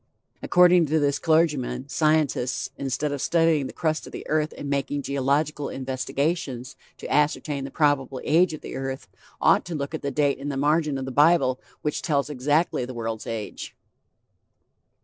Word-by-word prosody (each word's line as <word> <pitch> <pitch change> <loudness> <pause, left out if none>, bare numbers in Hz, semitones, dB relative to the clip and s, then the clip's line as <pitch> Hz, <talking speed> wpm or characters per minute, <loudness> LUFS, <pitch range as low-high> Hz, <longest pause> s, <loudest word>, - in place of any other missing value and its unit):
According 180 -2 +5
to 155 +3 +1
this 145 -2 +1
clergyman, 150 -6 +1
scientists, 150 -3 0
instead 140 +2 -2
of 140 -2 -3
studying 165 -3 +2
the - - -8
crust 155 -2 -2
of - - -10
the - - -8
earth 155 0 0
and 145 - -6
making 140 0 -1
geological 140 +2 0
investigations 135 0 -3 0.2
to - - -8
ascertain 145 -1 +1
the - - -6
probable 135 -3 +1
age 170 +4 +3
of - - -12
the - - -7
earth, 135 0 -5 0.3
ought - - +4
to 175 - -5
look 140 +1 -4
at 160 - -4
the 140 - -2
date 140 0 +1
in 140 +1 -4
the 140 - -3
margin 150 0 +1
of 135 - -4
the 135 - -5
bible 145 -2 +4 0.2
which 150 - -1
tells 145 -2 0
exactly 145 +2 +1
the 125 0 -6
world's 115 -1 -4
age. 110 -2 -6
145 Hz, 170 wpm, -25 LUFS, 135-155 Hz, 0.3 s, According